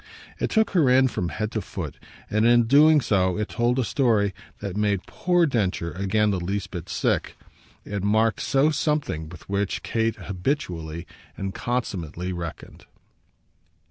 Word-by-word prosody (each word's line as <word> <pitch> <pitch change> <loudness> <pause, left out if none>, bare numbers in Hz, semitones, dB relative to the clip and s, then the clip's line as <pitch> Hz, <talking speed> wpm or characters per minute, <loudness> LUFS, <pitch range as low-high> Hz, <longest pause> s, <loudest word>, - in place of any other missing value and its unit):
It - - 0
took 220 0 +2
her 165 -9 +4
in 130 +1 +5
from 90 -6 -2
head 105 +8 -3
to 110 - -2
foot, 85 -8 -6 0.3
and 110 +1 +1
in 120 +1 +6
doing 150 +5 +6
so 95 -5 +1
it 105 0 -2
told 120 +2 +1
a 130 - +2
story 110 -5 +2 0.3
that 100 -2 -5
made 100 -2 0
poor 175 -1 +2
Densher 100 - -1
again 100 +3 +1
the 95 - -1
least 100 +3 -3
bit 90 -2 -6
sick: - - -1 0.5
it 100 -1 -3
marked 110 +2 +2
so 140 +3 +2
something 140 - -1
with 85 -1 -12
which 100 0 -1
Kate 115 0 0
habitually 90 - -3 0.3
and 95 0 -4
consummately 90 -8 -3
reckoned. 85 -2 -7
105 Hz, 155 wpm, -25 LUFS, 90-125 Hz, 0.5 s, in